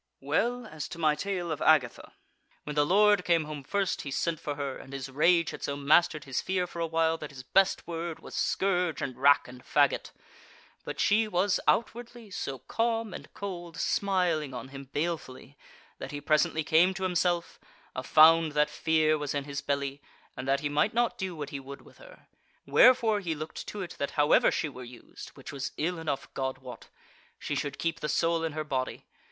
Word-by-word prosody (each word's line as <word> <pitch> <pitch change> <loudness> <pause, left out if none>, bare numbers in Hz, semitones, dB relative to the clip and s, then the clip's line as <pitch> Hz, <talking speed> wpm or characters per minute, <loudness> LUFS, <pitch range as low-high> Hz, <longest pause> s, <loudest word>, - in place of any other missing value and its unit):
Well, 235 - 0
as 155 -8 -6
to - - -9
my 155 -2 +3
tale 175 +1 -3
of 155 - -4
Agatha. 145 -6 +2 0.5
When 150 - -6
the 145 0 +3
lord 205 +1 +4
came 170 -2 +2
home 150 -2 -7
first, 195 +6 -1
he 140 - -6
sent 160 +4 -1
for 145 -3 -4
her, 140 -2 -4
and 135 - -11
his 135 -1 -5
rage 170 +4 +3
had - - -9
so 140 - -3
mastered 150 +1 +3
his 135 -2 -2
fear 185 -1 -1
for 170 - -9
a 165 - 0
while 165 0 +1
that 150 - -7
his 130 -3 -10
best 195 +8 +2
word 170 -1 -4
was - - -12
scourge 180 -4 0
and 130 -2 -4
rack 140 +3 +4
and 125 0 -12
faggot; - - +2 0.7
but - - -6
she 215 +2 +3
was, 190 0 +1
outwardly, 235 -1 -1
so 135 -6 -4
calm 225 - -1
and - - -9
cold, 175 -4 -6
smiling 175 -10 0
on 130 +2 -7
him 135 0 -9
balefully, 140 -2 -4 0.4
that - - -6
he 145 - -5
presently 155 +1 +1
came 170 +5 +4
to 190 - -5
himself, 175 -1 0 0.4
a 130 - -2
found 160 +3 +6
that 150 0 +2
fear 155 -1 +2
was 145 -1 -3
in 140 - -1
his 140 0 -5
belly, 140 0 -2 0.3
and 130 +1 -6
that 135 +1 +2
he 150 - -1
might 150 +9 +1
not 240 0 +1
do 190 -2 -3
what 150 -2 -6
he 140 - -4
would 135 +1 -10
with - - -19
her; - - -16 0.4
wherefore 225 -4 +5
he 170 -5 -3
looked 155 +1 -7
to 205 -2 -5
it 175 - -9
that 140 - -1
however 145 0 +5
she - - -1
were 130 -3 -9
used 120 0 -11
(which - - -9
was 135 -1 -4
ill 170 +2 -1
enough, 150 -4 -3
God 130 -1 -2
wot!) 130 -1 -11 0.5
she - - -4
should 145 -1 -3
keep 165 0 -2
the 150 - -3
soul 165 0 +1
in 160 -2 -2
her 155 0 -3
body. 130 -4 -3
155 Hz, 205 wpm, -29 LUFS, 140-180 Hz, 0.7 s, found